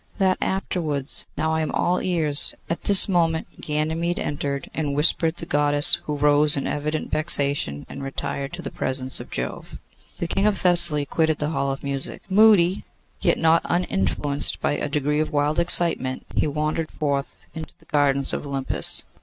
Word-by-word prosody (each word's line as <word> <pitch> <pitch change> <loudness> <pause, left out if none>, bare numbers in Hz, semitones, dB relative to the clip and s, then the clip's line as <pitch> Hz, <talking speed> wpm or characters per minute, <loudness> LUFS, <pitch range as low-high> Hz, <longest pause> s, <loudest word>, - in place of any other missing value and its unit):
'That 190 -2 -1
afterwards. 160 -7 -4
Now! 160 0 -2
I 160 - -2
am 155 - -4
all 180 +1 -1
ears.' 160 -5 +1 0.2
At 170 - -6
this 200 -1 +8
moment 165 -4 -3
Ganymede 160 +3 -3
entered, 140 -1 -5
and 145 -3 -4
whispered 160 +2 +1
the - - -8
Goddess, 145 0 +7
who 150 - -5
rose 145 0 +3
in 140 - -4
evident 150 +1 -5
vexation, 140 - -1
and 140 - -11
retired 135 +1 -6
to 175 0 -8
the 135 - -8
presence 130 0 -4
of - - -12
Jove. 60 +1 -7 0.4
The - - -5
King 195 +4 -1
of 205 -2 -1
Thessaly 170 -5 +5
quitted 160 +2 -2
the 150 - -4
Hall 140 -4 -3
of 135 - -8
Music. 140 -1 -6
Moody, 200 -3 +3 0.4
yet - - 0
not 165 0 +1
uninfluenced 145 - -3
by - - -2
a 145 0 -4
degree 150 +1 -2
of 155 - -3
wild 150 +2 -2
excitement, 170 -6 +5
he - - -1
wandered 155 +2 -4
forth 140 -2 -5
into 160 -1 -10
the - - -26
gardens 140 -2 -1
of - - -6
Olympus. 135 -1 0
150 Hz, 170 wpm, -21 LUFS, 140-170 Hz, 0.4 s, this